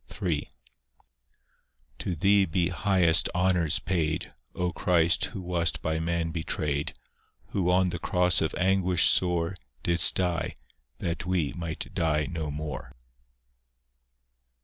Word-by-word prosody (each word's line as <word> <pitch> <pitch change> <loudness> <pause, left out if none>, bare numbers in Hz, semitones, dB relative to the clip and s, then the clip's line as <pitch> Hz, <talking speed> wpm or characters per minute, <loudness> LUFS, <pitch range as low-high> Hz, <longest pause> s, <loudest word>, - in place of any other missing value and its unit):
III 85 -6 -1 1.5
To 90 - -2
Thee 100 +4 +4
be 85 0 0
highest 90 -3 +3
honours 90 -4 +2
paid, 80 -3 -2 0.2
O 90 0 -1
Christ, 85 -1 +2
who 100 - -7
wast 85 -3 0
by 80 0 0
man 85 0 -1
betrayed, 75 -3 -2 0.6
Who 90 -3 0
on 90 0 +3
the 85 -1 -4
cross 90 0 +2
of 80 - -1
anguish 95 -1 +3
sore 90 0 +1 0.3
Didst 85 0 +4
die, 90 -3 -1 0.4
that 85 0 -3
we 90 -6 0
might 85 -3 -6
die 75 -2 +1
no 80 -3 -4
more. 75 -1 -6
85 Hz, 120 wpm, -27 LUFS, 80-90 Hz, 1.5 s, Thee